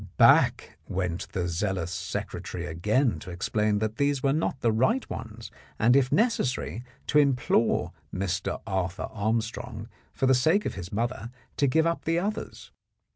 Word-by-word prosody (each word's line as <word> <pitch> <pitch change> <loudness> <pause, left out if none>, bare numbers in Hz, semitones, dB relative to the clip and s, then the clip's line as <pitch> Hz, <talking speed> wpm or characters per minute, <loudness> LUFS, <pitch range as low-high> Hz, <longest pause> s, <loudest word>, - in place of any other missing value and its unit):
Back - - +4
went 90 -2 -3
the 90 -2 -1
zealous 85 0 -1
secre 90 -1 -4
tary 90 -1 -5
again 105 - +1
to 90 - -10
explain 105 +4 0
that 110 +1 -2
these 140 -1 +1
were 135 -1 +3
not 150 -3 -1
the 115 - +3
right 130 - +1
ones, 115 0 -7 0.3
and, 120 +3 +4
if 135 -2 +3
necessary, 135 - 0 0.2
to 150 - +3
implore 130 -5 +2 0.2
Mr. 95 0 -2
Arthur 95 -2 -2
Arm 110 +2 +1
strong, 115 0 -7 0.2
for - - -1
the 130 - +5
sake 160 +11 +3
of - - -2
his 90 -1 -7
mother, 115 +1 -2 0.3
to 140 - +3
give 160 +5 +3
up 170 0 -1
the 165 +1 +1
others. 210 +5 -4
115 Hz, 165 wpm, -27 LUFS, 95-135 Hz, 0.3 s, the